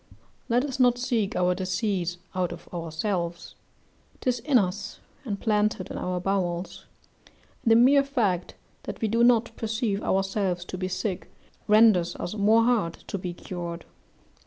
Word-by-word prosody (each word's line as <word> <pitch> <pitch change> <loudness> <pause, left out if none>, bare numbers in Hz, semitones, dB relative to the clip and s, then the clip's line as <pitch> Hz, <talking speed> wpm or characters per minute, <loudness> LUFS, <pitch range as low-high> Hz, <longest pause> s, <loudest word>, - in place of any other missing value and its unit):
Let 245 +3 +2
us 270 -2 -5
not 245 -1 +4
seek 235 -3 -1
our 180 0 +2
disease 185 -1 -2 0.2
out 185 -2 -1
of 175 0 -10
ourselves; 170 +1 -3 0.7
'tis 250 -1 0
in 270 +2 +3
us, 205 0 -2 0.3
and 205 -4 -3
planted 210 -3 0
in - - -5
our 180 0 -2
bowels; 180 -1 -2 0.8
and - - 0
the - - +7
mere 270 +4 +6
fact 215 -10 -1 0.3
that - - -6
we 225 - 0
do 230 +2 +2
not 235 -1 +3
perceive 220 -2 -1
ourselves 190 -2 0
to 185 - -6
be 185 - -1
sick, 185 0 -3 0.4
renders 210 -5 +5
us 175 - -5
more 215 +2 +4
hard 225 -9 +2 0.2
to 200 - -3
be 180 -1 -4
cured. 170 -2 -6
200 Hz, 155 wpm, -26 LUFS, 180-230 Hz, 0.8 s, the